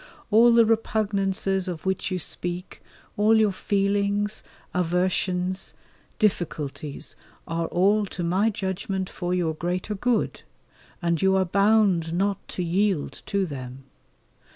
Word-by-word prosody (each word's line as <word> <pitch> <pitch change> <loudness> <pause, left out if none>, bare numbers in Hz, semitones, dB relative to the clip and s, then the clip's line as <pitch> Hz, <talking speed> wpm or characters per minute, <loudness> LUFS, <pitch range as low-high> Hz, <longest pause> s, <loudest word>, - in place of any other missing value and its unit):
All 230 +3 +7
the 230 -1 +6
repugnances 200 -4 0
of 175 -2 -5
which 190 0 -1
you 185 - -1
speak, 175 +1 -5 0.4
all 215 +2 +5
your 215 -2 +4
feelings, 200 +2 0 0.3
aversions, 180 +1 0 0.4
difficulties, 155 -8 -2 0.3
are 165 -1 -1
all 200 +3 +2
to 180 - -5
my 185 +6 +2
judgement 190 -1 -3
for 175 0 -4
your 170 -3 0
greater 180 +5 -2
good, 235 +4 0 0.6
and 170 -1 +1
you 190 0 +4
are 190 -1 +3
bound 195 -3 +3
not 195 +2 -1
to 180 - -3
yield 185 -2 0
to 200 -1 +1
them. 130 -4 -7
190 Hz, 125 wpm, -25 LUFS, 175-205 Hz, 0.6 s, All